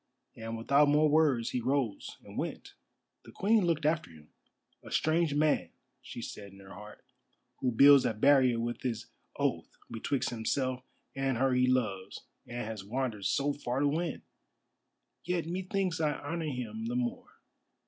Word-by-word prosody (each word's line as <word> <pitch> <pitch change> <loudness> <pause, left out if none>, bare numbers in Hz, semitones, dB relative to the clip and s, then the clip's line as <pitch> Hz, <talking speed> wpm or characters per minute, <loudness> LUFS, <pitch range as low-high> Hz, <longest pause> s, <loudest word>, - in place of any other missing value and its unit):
And 115 0 -6
without 140 +6 +4
more 150 +1 +4
words 145 -6 +2
he 125 - -1
rose 130 -4 -2
and - - -12
went. - - -5 0.5
The - - -13
Queen 210 0 +2
looked 155 -3 0
after 155 0 +1
him. 75 -2 -17 0.5
"A - - -11
strange 160 -1 +1
man," 150 0 +2 0.3
she 120 - -8
said 100 -1 -8
in 100 - -15
her 95 0 -12
heart, 105 +5 -12 0.5
"who 125 - 0
builds 140 +3 +7
a 110 - 0
barrier 130 0 +4
with 120 0 -3
his 115 -3 -4 0.2
oath - - -1 0.2
betwixt 120 +3 -2
himself 125 +3 -1 0.3
and 135 -2 0
her 130 +1 +2
he 125 0 +3
loves 110 -7 -1 0.2
and 120 -2 -5
has 110 -2 -6
wandered 110 -2 -3
so 145 +1 +1
far 130 -2 -3
to 145 - +3
win! 160 +3 -2 1.0
Yet 175 -1 -1
methinks 185 0 -2
I 150 -1 +2
honour 165 +3 -4
him 115 -6 -4
the 120 - -2
more. 125 -1 -3
130 Hz, 160 wpm, -31 LUFS, 115-150 Hz, 1.0 s, builds